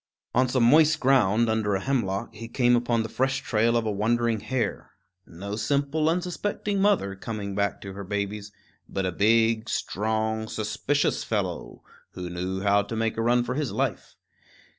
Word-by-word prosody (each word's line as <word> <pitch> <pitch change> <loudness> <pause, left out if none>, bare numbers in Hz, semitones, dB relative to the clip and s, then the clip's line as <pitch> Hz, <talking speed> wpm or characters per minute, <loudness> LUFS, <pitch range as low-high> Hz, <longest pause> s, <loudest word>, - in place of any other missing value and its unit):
On 130 +1 +3
some 125 -1 +2
moist 155 +5 +5
ground, 120 -4 +3
under 110 -2 +1
a - - 0
hemlock, 115 -3 -1
he 115 +2 -8
came 120 +1 +3
upon 120 -1 +1
the - - -4
fresh 130 +3 -1
trail 115 +1 +2
of 115 - -1
a 110 - 0
wandering 115 +2 +1
hare 130 +2 -3 0.3
no 100 +5 -6
simple, 140 +6 0
unsuspecting 180 +3 -2
mother, 195 - +2
coming 100 -1 -5
back 100 0 -1
to 100 -1 -7
her 100 +1 -7
babies, 100 +1 -4 0.4
but 95 -1 -2
a 90 - 0
big, 110 +3 +2
strong, 110 +1 -1
suspicious 110 +8 -1
fellow, - - -3 0.3
who 90 -1 -6
knew 90 +2 -3
how 100 0 +3
to 100 +3 -6
make 115 0 -1
a 115 - -2
run 120 +1 +3
for 125 +1 -3
his 145 -1 -2
life. - - -3
115 Hz, 170 wpm, -26 LUFS, 100-125 Hz, 0.4 s, moist